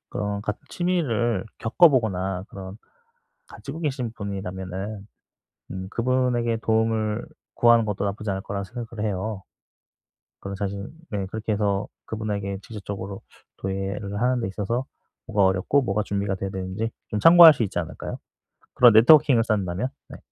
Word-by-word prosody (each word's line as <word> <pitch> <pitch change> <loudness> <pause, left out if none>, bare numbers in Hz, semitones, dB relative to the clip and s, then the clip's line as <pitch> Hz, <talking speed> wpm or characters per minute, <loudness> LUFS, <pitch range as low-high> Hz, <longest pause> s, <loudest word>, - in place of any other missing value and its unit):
어 105 -1 -2
같은 105 0 -4
취미를 120 - 0
겪어 160 +10 +5
보거나 95 -8 0
그런 95 0 -9 0.7
가지고 140 +4 -8
계신 135 -7 -2
분이라면은 95 0 -5 0.6
음 95 0 -5
그분에게 120 -1 +1
도움을 110 -1 0 0.3
구하는 120 -1 +5
것도 100 -1 -2
나쁘지 100 +2 -3
않을 95 0 -2
거라고 100 0 -4
생각을 115 +2 -6
해요. 100 0 -3 1.0
그리고 100 0 -6
사실 100 +1 -4 0.2
네 100 -2 -2
그렇게 110 +2 -3
해서 100 -1 0 0.2
그분에게 100 -3 -3
직접적으로 100 -2 -7 0.4
도예를 100 +1 -3
하는 125 +1 +2
데 115 - -2
있어서 115 +7 -2 0.4
뭐가 105 -4 +2
어렵고 95 +9 +2
뭐가 105 -4 0
준비가 100 -2 -2
돼야 95 - -4
되는지 95 +4 -3 0.2
좀 105 - -2
참고할 165 +4 +10
수 130 - -2
있지 95 -4 -2
않을까요? 85 -2 -5 0.6
그런 120 -1 +7
네트워킹을 125 +1 +7
쌓는다면 100 0 -1 0.2
네. - - -9
105 Hz, 345 characters per minute, -24 LUFS, 95-120 Hz, 1.0 s, 참고할